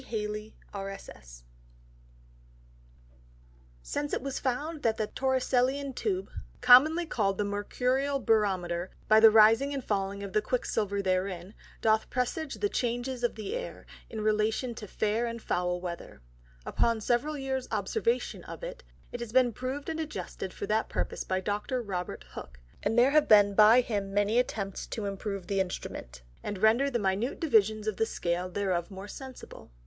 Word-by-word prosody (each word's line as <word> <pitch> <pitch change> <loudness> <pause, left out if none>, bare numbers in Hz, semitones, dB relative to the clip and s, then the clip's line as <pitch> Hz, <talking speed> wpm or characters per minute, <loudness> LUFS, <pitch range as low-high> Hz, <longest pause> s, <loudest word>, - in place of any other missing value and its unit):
Halley_, 210 -1 -4 0.2
R. 195 -1 -4
S. 195 - -9
S._ - - -13 2.4
Since 290 - -3
it - - -1
was 275 -1 -3
found 290 +4 -2
that 225 -4 +1
the 215 - 0
Torricellian 265 +2 0
Tube, 380 - -2 0.3
commonly 290 +8 +7
call'd 200 - 0
the 210 - +1
Mercurial 250 +7 0
Barometer, 190 -6 +1 0.2
by 215 0 +7
the 225 0 +9
rising 225 +6 +5
and 270 - -4
falling 200 -1 -2
of 195 -2 -7
the 215 - +3
Quick 250 +3 -1
silver 200 -1 -1
therein, 185 0 -1 0.3
doth 220 0 +2
presage 275 +4 -2
the 410 - 0
Changes 245 - -2
of 240 - +1
the 310 - -4
Air, - - -6 0.2
in 220 - -5
relation 215 +3 +1
to 215 -2 -8
fair 215 +4 0
and 230 0 -5
foul 180 -4 -1
Weather; 170 - -7 0.4
upon 230 -1 +1
several 245 +7 0
Years 265 -2 -3
Observation 465 +2 -1
of - - -9
it, - - -6 0.3
it 245 - -5
has 235 -2 -6
been 250 -1 +4
proved 260 +5 -4
and 320 0 -3
adjusted 305 -10 -5
for - - -5
that 220 +1 0
purpose - - -2
by 185 0 -1
Dr. 210 +6 -2
Robert 185 -6 -5
Hook; - - -9 0.2
and 225 - 0
there 250 +3 +6
have 305 0 +4
been 205 -1 +6
by 215 +4 +7
him 205 -5 -3
many 205 +3 +3
attempts 200 -6 -3
to 220 - -4
improve 195 -1 -4
the 195 +1 -1
Instrument, 65 - -5 0.2
and 205 - -4
render 225 +7 +4
the 245 - 0
Minute 205 +4 -1
Divisions 215 -7 +2
on 215 - -1
the 225 - +1
Scale 175 -2 -2
thereof 185 -3 -1
more 195 0 -8
sensible. 260 +3 -10
220 Hz, 165 wpm, -29 LUFS, 200-255 Hz, 2.4 s, the